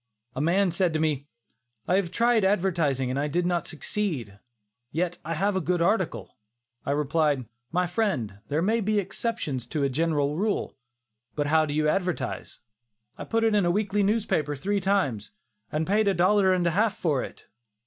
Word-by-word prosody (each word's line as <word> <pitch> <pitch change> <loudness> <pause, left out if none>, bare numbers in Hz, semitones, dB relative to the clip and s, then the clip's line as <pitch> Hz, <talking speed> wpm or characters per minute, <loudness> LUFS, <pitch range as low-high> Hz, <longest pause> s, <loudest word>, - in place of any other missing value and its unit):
A 130 - -2
man 180 +4 +2
said 175 -1 +1
to 155 - 0
me, 150 -3 0 0.6
"I 185 - +3
have 195 -3 0
tried 235 +2 +2
advertising, 170 -10 +1
and 145 +1 -1
did 175 +3 +1
not 175 -2 0
succeed; 150 - -3 0.5
yet 175 +2 -1
I 165 +2 -3
have 195 +4 +1
a 190 - +1
good 175 +2 0
article." 170 - 0 0.5
I - - -5
replied, 145 -1 +1 0.3
"My 180 +2 +1
friend, 170 - -1
there 155 +3 0
may 225 +4 +2
be 215 +1 +1
exceptions 195 - -2
to 145 +3 -2
a 140 - +2
general 150 0 0
rule. 210 +2 -1 0.6
But 145 - 0
how 155 +1 +3
do 145 - -3
you 155 0 +2
advertise?" 180 +2 -2 0.6
"I - - -7
put 225 0 0
it 225 -1 +3
in 205 -2 +3
a 175 - +2
weekly 205 +2 +1
newspaper 195 -8 +1
three 200 +8 -1
times, 185 - 0 0.4
and 155 +1 0
paid 210 +3 +2
a 195 - +3
dollar 190 +2 +4
and 180 -1 +2
a 170 - +3
half 210 +4 +1
for 150 -7 +1
it." - - -9
175 Hz, 180 wpm, -26 LUFS, 150-200 Hz, 0.6 s, dollar